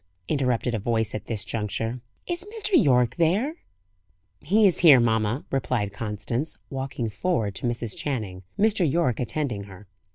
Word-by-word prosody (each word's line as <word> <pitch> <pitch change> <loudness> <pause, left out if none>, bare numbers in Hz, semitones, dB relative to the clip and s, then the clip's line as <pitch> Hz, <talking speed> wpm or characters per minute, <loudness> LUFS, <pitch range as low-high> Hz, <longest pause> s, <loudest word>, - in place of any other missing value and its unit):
interrupted 125 -4 0
a 110 - 0
voice 110 0 0
at 105 - -5
this 110 -3 -2
juncture. 115 +3 -3 0.2
"Is 350 0 -2
Mr. 420 0 -3
Yorke 125 - +4
there?" 205 - +1 0.8
"He 205 +8 +3
is 185 - +4
here, 150 -7 +8
mamma," 110 +2 +1
replied 120 -6 -1
Constance, 115 +7 -3
walking 135 -3 -3
forward 110 - -1
to - - -2
Mrs. 120 -2 -2
Channing, 105 -10 -3 0.2
Mr. 200 -7 +2
Yorke 160 -7 +1
attending 125 -5 -2
her. 100 0 -13
125 Hz, 150 wpm, -25 LUFS, 110-160 Hz, 0.8 s, here